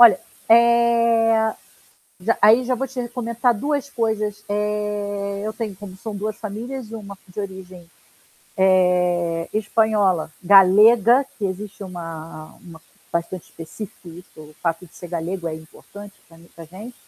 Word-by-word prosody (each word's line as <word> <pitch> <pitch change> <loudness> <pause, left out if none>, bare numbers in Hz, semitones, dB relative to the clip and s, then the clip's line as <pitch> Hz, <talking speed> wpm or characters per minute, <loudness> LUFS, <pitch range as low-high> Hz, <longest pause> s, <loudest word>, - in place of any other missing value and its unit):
Olha, 225 -6 +9 0.3
eh, 235 -1 +4 0.9
já 215 +6 0
aí 225 +4 +6
já 255 +1 0
vou 270 +3 -3
te 260 0 -7
re 240 - -6
comentar 240 0 0
2 285 +5 -2
coisas. 215 -4 -2
Eh, 205 -1 -2
eu 215 - -2
tenho 220 -3 -5
como 190 -1 -11
são 215 +1 -6
2 210 +1 -4
famílias, 230 +3 -6
uma 200 -3 -8
de 180 - -8
origem, 185 -3 -8 0.7
eh, 180 -3 +2
espanhola 210 -6 +1
galega, 210 +6 +6
que 205 - -1
existe 200 +2 -6
uma 165 -3 -8
uma 170 -3 -13 0.3
bastante 170 +1 -3
específica, 165 +5 -10
isso 170 +2 -12
o 155 0 -13
fato 170 +1 -2
de 170 - -21
ser 175 - -9
galego 170 +1 -3
é 160 - -4
importante 200 +5 -13
pra 165 - -18
muita 170 0 -14
gente 200 +9 -11
205 Hz, 145 wpm, -22 LUFS, 180-225 Hz, 0.9 s, Olha